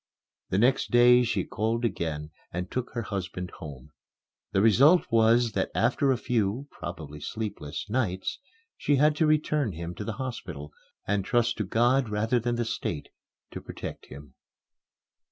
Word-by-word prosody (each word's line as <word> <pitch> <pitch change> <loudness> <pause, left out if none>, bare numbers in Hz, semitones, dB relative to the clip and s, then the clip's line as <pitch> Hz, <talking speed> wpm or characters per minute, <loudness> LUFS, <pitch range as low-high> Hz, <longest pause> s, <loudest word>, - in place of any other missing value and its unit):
The 95 - +1
next 125 +5 +3
day 125 0 +6
she 110 -6 0
called 115 +5 -1
again 80 -7 -3 0.2
and 90 +1 -4
took 125 -1 -3
her 120 - -1
husband 90 -3 -4
home. 70 -5 -9 0.6
The - - +2
result 135 - +6
was 115 +1 +4
that 95 -2 -1
after 120 +7 +2
a 130 - +2
few 120 +2 -1
(probably 75 -4 -7
sleepless) 100 -5 -5
nights, 105 -5 -1 0.4
she 145 - +1
had 150 +2 +4
to 160 - +3
return 150 -6 +1
him 85 +2 -5
to 105 - -6
the 110 - -3
hospital 90 - -6 0.3
and 100 -1 0
trust 120 +2 +1
to - - +1
God 120 +5 +2
rather 110 +3 +1
than 120 +1 -1
the 120 0 -1
State 80 -8 -3 0.4
to - - -7
protect - - -8
him. 70 +2 -12
110 Hz, 155 wpm, -27 LUFS, 90-125 Hz, 0.6 s, day